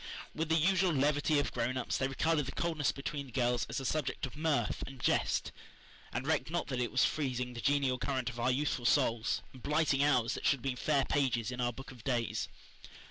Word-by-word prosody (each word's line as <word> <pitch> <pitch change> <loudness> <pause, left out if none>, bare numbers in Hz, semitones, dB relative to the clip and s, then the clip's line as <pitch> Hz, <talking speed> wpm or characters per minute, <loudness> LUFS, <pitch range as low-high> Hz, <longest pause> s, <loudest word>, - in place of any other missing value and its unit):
With 160 0 -2
the 160 - +4
usual 185 +3 +3
levity 145 +2 +2
of 145 - +1
grown 125 +2 -1
ups, 130 - -1
they 135 - +1
regarded 150 +1 +1
the - - -3
coldness 160 -5 0
between 140 0 -5
the - - -13
girls 120 -1 +1
as - - -2
a 135 - -5
subject 145 -1 -1
of 135 - -9
mirth 155 -1 0
and 135 -1 -10
jest, - - +1 0.6
and 130 - -3
recked 155 0 +1
not 175 +1 -1
that 130 -2 -2
it 120 - -1
was - - +4
freezing 125 -4 -1
the 120 - -6
genial 140 -3 +2
current 130 -3 -1
of 120 - -9
our 120 +2 +2
youthful 130 -2 0
souls, 120 -4 +2
and 130 - -12
blighting 150 -1 +2
hours 125 -5 +3
that - - -5
should 140 - +3
have 120 - -17
been 135 -2 -1
fair 140 +1 +1
pages 125 -5 +1
in 125 0 -4
our 120 0 +1
book 135 +2 -10
of 120 -4 -13
days. 120 -4 -1
135 Hz, 225 wpm, -33 LUFS, 125-150 Hz, 0.6 s, the